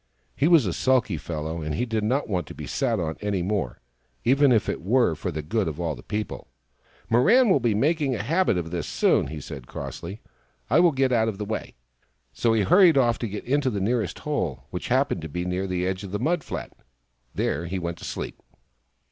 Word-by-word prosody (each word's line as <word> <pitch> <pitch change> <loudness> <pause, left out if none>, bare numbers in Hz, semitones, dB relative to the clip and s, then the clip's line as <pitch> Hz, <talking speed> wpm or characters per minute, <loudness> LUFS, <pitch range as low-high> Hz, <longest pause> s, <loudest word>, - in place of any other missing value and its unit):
He 145 - +2
was 165 -8 +6
a 90 - -1
sulky 130 -6 +2
fellow, 80 +1 -4
and 75 -1 -3
he 125 - 0
did 110 -2 -1
not 130 +7 0
want 90 -7 -2
to - - -9
be - - -7
sat 120 -6 0
on 80 -2 -3
any 100 -4 -1
more, 95 - -2 0.4
even 135 +2 +4
if 115 -3 +3
it - - -2
were 115 0 +3
for 85 - -4
the 80 -3 -4
good 105 +5 0
of 80 0 -4
all 85 -3 -1
the - - -10
people. 105 0 -4 0.3
" - - -31
Mirran 220 - +5
will 145 - +5
be 115 -4 +1
making 145 +2 +1
a - - -3
habit 165 - +2
of 80 -2 -3
this 85 -3 -3
soon," - - +2
he 80 - -6
said 70 -3 -9
crossly; 100 - -7 0.5
"I 145 - +6
will 175 -1 +6
get 135 -2 +1
out 115 -2 +3
of 110 -3 -2
the 105 - -4
way." 110 +1 -5 0.6
So 115 - +1
he 110 -2 +2
hurried 175 - +6
off, 120 -3 +2
and 115 -4 -3
got 105 - -5
into 140 +1 +1
the 105 -5 -2
nearest 105 -3 0
hole, 85 - -2
which 90 - -4
happened 130 -7 +1
to 80 - -6
be 90 +4 -3
near 90 +2 -2
the 90 -1 -1
edge 95 +1 -2
of 100 - -6
the 105 - -1
mud 170 +3 0
flat. - - -6 0.6
There 85 +4 -1
he 95 +3 -3
went 85 -1 -4
to - - -12
sleep. - - -5
105 Hz, 230 wpm, -25 LUFS, 85-130 Hz, 0.6 s, was